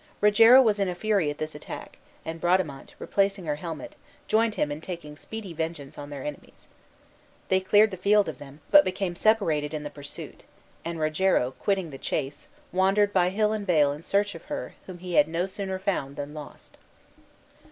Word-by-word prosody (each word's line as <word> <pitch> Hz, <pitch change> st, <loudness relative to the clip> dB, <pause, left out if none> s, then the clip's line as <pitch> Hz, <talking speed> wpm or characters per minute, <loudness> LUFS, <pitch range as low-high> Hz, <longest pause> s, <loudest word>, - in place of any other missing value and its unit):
Rogero 225 Hz, +5 st, +7 dB
was 210 Hz, -3 st, +2 dB
in 195 Hz, -2 st, +1 dB
a 180 Hz, -, -3 dB
fury 200 Hz, -5 st, +1 dB
at 145 Hz, -, -5 dB
this 155 Hz, 0 st, -4 dB
attack; 150 Hz, -, -9 dB, 0.3 s
and 165 Hz, 0 st, -6 dB
Bradamante, 175 Hz, -6 st, 0 dB
replacing 195 Hz, -2 st, 0 dB
her 150 Hz, -1 st, -1 dB
helmet, 165 Hz, 0 st, -7 dB, 0.3 s
joined 220 Hz, 0 st, +2 dB
him 150 Hz, -, 0 dB
in 145 Hz, +2 st, -5 dB
taking 165 Hz, -4 st, -7 dB
speedy 205 Hz, +3 st, -7 dB
vengeance 160 Hz, -3 st, -4 dB
on 145 Hz, 0 st, -8 dB
their 140 Hz, -2 st, -7 dB
enemies. 150 Hz, -1 st, -9 dB, 0.8 s
They 190 Hz, -, +4 dB
cleared 205 Hz, +3 st, +4 dB
the 190 Hz, -, -6 dB
field 205 Hz, +3 st, +3 dB
of 155 Hz, -5 st, -6 dB
them, 145 Hz, +1 st, -12 dB
but 295 Hz, 0 st, +9 dB
became 185 Hz, -1 st, -2 dB
separated 165 Hz, -8 st, +2 dB
in 150 Hz, -, -4 dB
the 145 Hz, -, -6 dB
pursuit, 145 Hz, 0 st, -9 dB, 0.4 s
and 170 Hz, -1 st, -4 dB
Rogero, 155 Hz, -4 st, +2 dB
quitting 190 Hz, +2 st, -1 dB
the 135 Hz, -, -9 dB
chase, 135 Hz, +2 st, -3 dB, 0.2 s
wandered 195 Hz, +3 st, +3 dB
by 180 Hz, -1 st, +3 dB
hill 210 Hz, +2 st, +1 dB
and 205 Hz, -2 st, -4 dB
vale 150 Hz, -5 st, +4 dB
in 150 Hz, -, -9 dB
search 200 Hz, +3 st, 0 dB
of -, -, -11 dB
her 290 Hz, -, -5 dB
whom 185 Hz, -2 st, -8 dB
he 180 Hz, 0 st, -7 dB
had 150 Hz, -, +5 dB
no 165 Hz, +3 st, -1 dB
sooner 190 Hz, 0 st, -4 dB
found 185 Hz, -8 st, -2 dB
than 145 Hz, +1 st, -6 dB
lost. 150 Hz, -1 st, -11 dB
175 Hz, 190 wpm, -26 LUFS, 150-200 Hz, 0.8 s, but